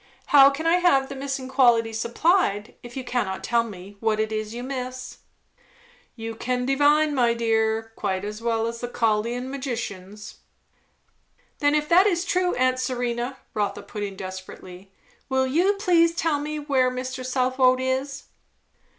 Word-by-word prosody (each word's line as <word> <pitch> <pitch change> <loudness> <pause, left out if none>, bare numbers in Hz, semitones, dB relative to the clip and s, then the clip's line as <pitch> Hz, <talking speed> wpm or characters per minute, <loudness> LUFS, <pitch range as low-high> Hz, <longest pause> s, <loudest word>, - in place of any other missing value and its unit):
"How 275 -1 +9
can 285 +3 -5
I 335 +2 +4
have 275 -7 +3
the 275 - -6
missing 270 -1 -4
quality 240 -4 +3
supplied, 235 - +1
if 240 +1 -10
you 260 - -3
cannot 235 -7 -2
tell 235 -1 +2
me 200 -2 -10
what 220 -1 0
it 220 0 -1
is 215 0 -3
you 240 +2 -6
miss?" 255 -1 -6 1.0
"You 225 -1 -6
can 250 +2 -2
divine, 290 +3 +3
my 240 -3 +2
dear, 225 -1 0
quite 190 +1 -2
as 210 +1 -6
well 225 -1 0
as 230 0 -5
the 245 - -3
Chaldean 235 +2 -1
magicians." 215 -7 -6 1.2
"Then 290 0 +3
if 300 0 0
that 370 +4 +6
is 350 -2 0
true, 365 -1 +1
aunt 255 0 +1
Serena," 245 0 -2 0.2
Rotha 205 -2 -2
put 210 - -7
in 200 -1 -4
desperately, 185 0 -9 0.4
"will 265 0 +2
you 340 +10 +2
please 345 -5 +3
tell 320 -4 0
me 305 +1 -4
where 275 -4 +1
Mr. 255 +1 -5
Southwode 255 0 +2
is?" 265 +2 -2
255 Hz, 160 wpm, -24 LUFS, 225-275 Hz, 1.2 s, How